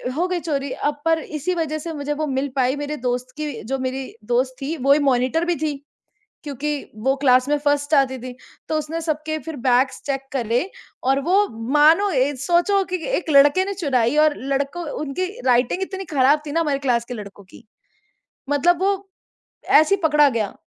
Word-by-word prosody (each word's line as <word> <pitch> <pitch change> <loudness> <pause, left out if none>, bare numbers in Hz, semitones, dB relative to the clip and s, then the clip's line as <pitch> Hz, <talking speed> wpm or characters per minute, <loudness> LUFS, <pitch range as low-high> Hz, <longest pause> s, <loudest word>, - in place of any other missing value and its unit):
हो 345 +4 0
गई 365 -1 -1
चोरी, 280 -4 -3
अब 290 +1 -3
पर 325 0 +3
इसी 310 +3 -3
वज़ह 315 -2 -2
से 330 - -4
मुझे 295 -1 -3
वो - - +1
मिल 270 0 -1
पाई 260 0 +1
मेरे 290 +1 -4
दोस्त 250 +1 -2
की 305 -1 -3 0.2
जो 270 - +1
मेरी 260 +1 -3 0.3
दोस्त 255 +2 +1
थी 290 +4 -3
वो 275 - +7
ही 295 - +3
मॉनिटर 260 +6 +1
भी 350 0 0
थी, 300 -1 -2 0.7
क्योंकि 290 0 -3 0.4
वो 265 - +4
क्लास 255 -1 +4
में 295 - +2
फर्स्ट 290 +1 +1
आती 265 -2 +2
थी। 250 +1 -8 0.3
तो 310 - 0
उसने 310 +2 -4
सबके 310 -1 -2
फिर 320 -2 -5
बैग्स 255 +2 +2
चेक 270 -1 -1
करे 245 - -1 0.3
और 270 +2 +2
वो 400 +3 +4 0.3
मानो 315 +7 +5
ए 280 -2 +1
सोचो 355 +5 +3
कि - - +2 0.2
एक 335 - -4
लड़के 290 +6 +5
ने 400 +1 -4
चुराई। 275 -8 0
और 305 -1 +2 0.2
लड़कों 285 +6 -2 0.2
उनकी 305 +6 -2 0.2
राइटिंग 250 +8 +2
इतनी 385 0 -4
खराब 280 +2 +4
थी 290 - -5
ना 330 - +1
हमारी 295 -4 0
क्लास 235 -2 +1
के 245 - -7
लड़कों 200 -2 -10
की, 195 +5 -17 0.9
मतलब 335 +5 +2
वो 395 +1 +2 0.8
ऐसे 315 +6 +5
ही 395 - -3
पकड़ा 300 -2 +5
गया। 225 -6 -2
290 Hz, 195 wpm, -21 LUFS, 260-320 Hz, 0.9 s, वो